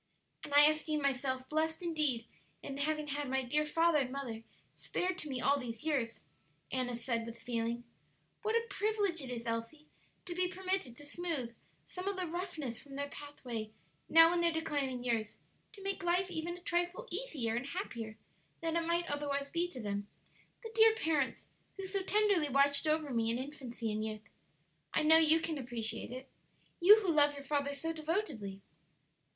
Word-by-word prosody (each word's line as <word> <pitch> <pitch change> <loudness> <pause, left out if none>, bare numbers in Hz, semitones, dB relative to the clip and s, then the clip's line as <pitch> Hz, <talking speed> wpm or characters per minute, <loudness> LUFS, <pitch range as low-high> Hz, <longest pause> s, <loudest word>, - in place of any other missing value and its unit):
"And - - -7
I 290 0 +10
esteem 310 0 +2
myself 260 -2 0
blest 320 +3 -1
indeed 300 -9 0 0.4
in 275 - -5
having 300 +1 -1
had 285 -1 -2
my 265 0 +1
dear 300 +5 +1
father 330 0 +3
and 255 -2 -1
mother 255 -5 -4 0.3
spared 370 0 -2
to 300 - -3
me 260 -2 -2
all 280 +2 +3
these 230 -3 -6
years," 270 -7 -1 0.5
Annis 245 -2 -2
said, 230 -3 0
with 230 0 -8
feeling. 235 0 -2 0.6
"What 435 +1 0
a 465 0 +2
privilege 410 -7 0
it 265 - -6
is, 240 -1 -5
Elsie, 230 +7 -3 0.4
to 350 - -4
be 360 +1 +1
permitted 370 -8 -2
to 290 - -9
smooth, 290 -6 -3 0.3
some 365 +1 -6
of 400 - 0
the 370 -1 -2
roughnesses 330 -8 -4
from 280 -2 -11
their 285 +1 -2
pathway 250 -7 -6 0.4
now 330 +1 +8
in 345 - +1
their 340 0 +4
declining 285 -6 -1
years; 225 -4 -1 0.4
to 400 -3 -11
make 390 0 -1
life 360 +1 +1
even 340 +1 -3
a - - -14
trifle 350 +7 -1
easier 320 - -2
and 245 +3 -2
happier 235 - -5 0.4
than 330 0 -1
it 335 -1 0
might 340 +1 +1
otherwise 285 -1 -2
be 340 +1 +1
to 260 - -9
them 205 -2 -3 0.6
the 450 - -6
dear 445 0 +7
parents 310 -9 0 0.3
who 390 - -4
so 390 +1 -1
tenderly 400 -6 +3
watched 280 +3 +3
over 310 -2 +1
me 225 -1 +1
in 230 - +1
infancy 255 -4 -5
and 215 0 -2
youth! 215 0 -5 0.7
I - - +4
know 320 +1 +8
you 320 0 +6
can 320 -3 -2
appreciate 235 -3 -3
it 255 +2 -7 0.5
you 415 +5 +8
who 375 -4 +1
love 290 -2 +5
your 280 - -8
father 285 0 0
so 325 +3 -3
devotedly. 310 - -3
295 Hz, 180 wpm, -34 LUFS, 250-345 Hz, 0.7 s, I